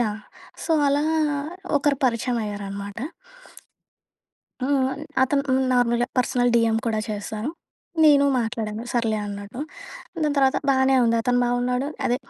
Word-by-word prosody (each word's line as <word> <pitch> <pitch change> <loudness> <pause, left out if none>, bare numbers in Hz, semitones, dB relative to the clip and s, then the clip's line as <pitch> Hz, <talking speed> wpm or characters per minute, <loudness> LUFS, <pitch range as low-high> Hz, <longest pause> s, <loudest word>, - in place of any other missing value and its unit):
Yeah! 215 -2 -1 0.4
So, - - -5 0.2
అలా 290 +2 +2 0.7
ఒకరు 280 -1 +1
పరిచయమయ్యారనమాట. 205 -4 -3 1.6
హ్మ్. 265 -1 +1 0.3
అతను 275 +2 +2
హ్మ్, 260 0 +3
నార్మల్‍గా 240 -1 +2
పర్సనల్ 245 0 +2
డీఎం 230 -1 +3
కూడా 220 -1 0
చేశారు. 215 +4 -4 0.5
నేను 285 -2 +6
మాట్లాడాను 225 -1 -3
సర్లే 225 -3 +1
అన్నట్టు. 205 +5 -7 0.6
దాని 295 -1 +1
తర్వాత 265 -1 +3
బానే 265 0 +3
ఉంది. 230 0 +2
అతను 245 +1 +2
బావున్నాడు, 250 +2 0 0.2
అదే 245 - +2
245 Hz, 115 wpm, -23 LUFS, 220-265 Hz, 1.6 s, నేను